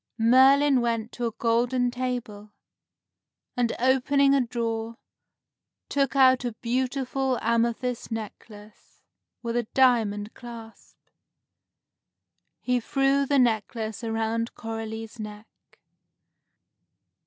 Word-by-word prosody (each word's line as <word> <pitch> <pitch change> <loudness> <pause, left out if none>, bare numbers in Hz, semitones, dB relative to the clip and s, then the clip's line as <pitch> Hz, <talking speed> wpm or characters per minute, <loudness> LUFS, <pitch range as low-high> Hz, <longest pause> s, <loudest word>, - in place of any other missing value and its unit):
Merlin 265 +3 +5
went 230 -1 -2
to 240 -1 -3
a - - -3
golden 240 +2 +1
table, 240 -5 -5 1.0
and, 240 -2 +1
opening 270 +2 +3
a 275 - +4
drawer, 230 -1 -3 0.9
took 275 -1 0
out 260 -2 +5
a 240 -2 -3
beautiful 255 +2 -1
amethyst 235 +2 -1
necklace, 215 -1 -10 0.4
with 235 0 -3
a 240 -2 -1
diamond 220 -5 +2
clasp. 230 -2 -12 1.6
He 250 0 +1
threw 275 +3 +1
the 285 - +2
necklace 225 -2 0
around 225 +1 -2
Coralie's 225 0 -6
neck. 210 0 -8
235 Hz, 95 wpm, -26 LUFS, 225-255 Hz, 1.6 s, Merlin